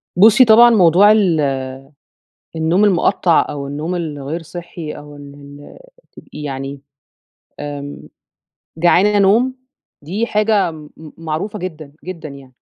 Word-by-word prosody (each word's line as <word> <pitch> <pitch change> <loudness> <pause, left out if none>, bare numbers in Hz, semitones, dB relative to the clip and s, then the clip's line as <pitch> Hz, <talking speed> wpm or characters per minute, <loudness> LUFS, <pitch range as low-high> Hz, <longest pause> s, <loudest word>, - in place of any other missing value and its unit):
بُصّي 220 +7 +6
طبعًا 235 +1 +7
موضوع 195 -1 +5
ال 160 -10 +1 0.9
النوم 165 +5 +1
المقطّع 180 -3 +2
أو 140 -1 -6
النوم 150 +5 -4
الغير 155 -1 -5
صحي 165 -1 -8
أو 145 0 -11
ال 145 -1 -12 0.8
ال - - -14
يعني 140 -2 -6 0.8
آمم 145 -1 -7 0.7
جعانة 185 +5 +3
نوم، 225 +7 +3 0.5
دي 195 +10 -3
حاجة 210 -5 +1
م 155 -2 -12 0.3
معروفة 165 +7 -5
جدًا 160 -6 -8
جدًا 170 -4 -7
يعني. 135 -2 -14
165 Hz, 115 wpm, -17 LUFS, 145-200 Hz, 0.9 s, طبعًا